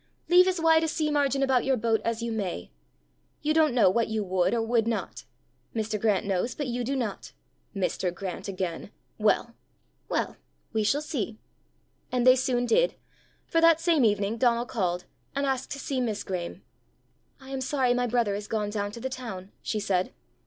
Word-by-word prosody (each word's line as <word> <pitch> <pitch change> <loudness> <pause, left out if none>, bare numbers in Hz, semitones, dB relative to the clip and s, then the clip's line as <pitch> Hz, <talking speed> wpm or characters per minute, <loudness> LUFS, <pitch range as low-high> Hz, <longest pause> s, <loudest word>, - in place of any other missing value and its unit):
"Leave 360 +1 +7
as 370 -2 +1
wide 325 0 +5
a - - +1
sea 310 -1 0
margin 280 -2 +2
about 260 -3 +3
your 265 -1 +2
boat 225 -1 +1
as 230 0 -1
you 235 - -2
may. 190 - -3 0.7
You 305 +1 +2
don't 310 -5 +3
know 235 - +6
what 225 +5 +2
you 220 -1 -1
would 185 -2 +1
or 230 -1 +1
would 225 -1 +1
not. 230 - -3 0.5
Mr. 215 -2 -2
Grant 210 -3 +2
knows, 195 +4 -1
but 290 - -3
you 245 -1 -2
do 270 +4 -1
not." 230 -7 -4 0.4
"Mr. 185 -1 -1
Grant 180 0 -6
again! 185 -2 -4 0.3
Well!" 220 +2 +2 0.6
"Well! - - -1 0.4
we 220 -1 +1
shall 285 +8 +1
see!" 235 -8 -3 0.7
And 250 -1 +1
they 255 0 +8
soon 250 -1 +1
did. - - +3 0.5
For 330 - +1
that 330 -1 +6
same 330 -4 +3
evening 210 0 +2
Donal 240 -1 +2
called, 180 -7 -2 0.3
and 280 0 0
asked 265 -1 -1
to 280 - -7
see 265 -2 -2
Miss 220 -4 -2
Graeme. 180 -2 -5 0.8
"I 265 0 -12
am 270 -1 -3
sorry 260 -2 +2
my 245 0 +1
brother 235 -3 +1
is 205 +1 -4
gone 210 -2 -1
down 205 -1 -2
to 235 - -7
the 255 - -3
town," 220 -7 -7
she 215 - -2
said. 190 -3 0
235 Hz, 190 wpm, -27 LUFS, 205-270 Hz, 0.8 s, they